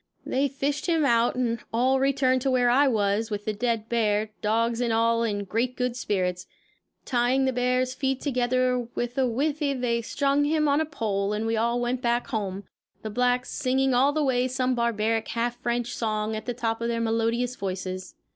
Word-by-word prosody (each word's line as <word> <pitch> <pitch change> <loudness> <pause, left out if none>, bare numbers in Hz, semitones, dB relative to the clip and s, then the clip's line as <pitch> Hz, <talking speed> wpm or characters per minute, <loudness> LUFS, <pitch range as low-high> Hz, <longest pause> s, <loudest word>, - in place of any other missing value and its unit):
They 275 +2 +1
fished 280 +2 -2
him 325 -3 +2
out 235 -2 +3
and 235 -2 0
all 255 +3 +2
returned 265 -1 +2
to 270 - 0
where 250 -2 +3
I 280 +3 +4
was, 215 -2 +1
with 205 -1 -4
the 215 - -1
dead 225 0 -1
bear, 215 -2 +1
dogs 230 +2 +1
and 240 -1 +1
all 230 +1 +2
in 205 -3 -1
great 235 +6 -2
good 250 -1 -1
spirits. 180 -6 -2 0.6
Tying 250 +2 +2
the 260 - +1
bear's 250 +1 +1
feet 270 -1 -1
together 255 -2 +1 0.2
with 240 0 -3
a 260 - +3
withe 285 +6 -1
they 250 -5 0
strung 280 +4 +1
him 305 0 +2
on 285 +2 +3
a - - 0
pole 205 -8 -1
and 215 +1 -2
we 225 0 0
all 235 +2 +1
went 245 +1 -1
back 240 0 +1
home, 200 -4 -3 0.4
the 215 - -4
blacks 250 +2 +1
singing 265 -1 +1
all 265 +4 +4
the 305 +1 0
way 255 -2 +2
some 255 0 0
barbaric 225 -2 0
half 235 +1 -2
French 240 0 -1
song 215 -1 -1
at 215 +1 -6
the 245 - -2
top 225 -1 -2
of 235 - -1
their 235 0 -1
melodious 230 +2 0
voices. 185 -2 -5
240 Hz, 195 wpm, -26 LUFS, 225-255 Hz, 0.6 s, I